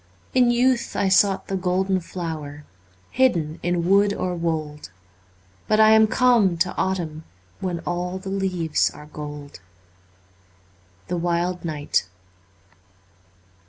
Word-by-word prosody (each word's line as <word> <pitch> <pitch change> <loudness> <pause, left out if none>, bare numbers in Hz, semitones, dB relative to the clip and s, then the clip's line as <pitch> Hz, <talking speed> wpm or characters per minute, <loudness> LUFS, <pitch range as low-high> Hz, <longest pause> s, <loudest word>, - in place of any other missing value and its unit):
In 250 -2 +4
youth 245 0 +1
I 195 - +1
sought 195 0 +3
the 195 - -3
golden 185 +1 0
flower 155 -5 -6 0.5
Hidden 170 -12 +1
in 175 -1 -1
wood 200 +1 +4
or 180 -1 -2
wold. 155 - -3 0.8
But 215 - +2
I 220 0 +7
am 220 0 +6
come 225 -7 +3
to 175 +2 0
autumn, 170 -5 -2 0.4
When 180 -3 -3
all 180 +1 -3
the 190 +1 -7
leaves 185 -5 0
are 150 - -12
gold. 150 -3 -9 0.7
' 90 0 -34
The 180 - -2
Wild 175 +1 -1
Knight.' 150 - -1
175 Hz, 125 wpm, -23 LUFS, 155-195 Hz, 0.8 s, I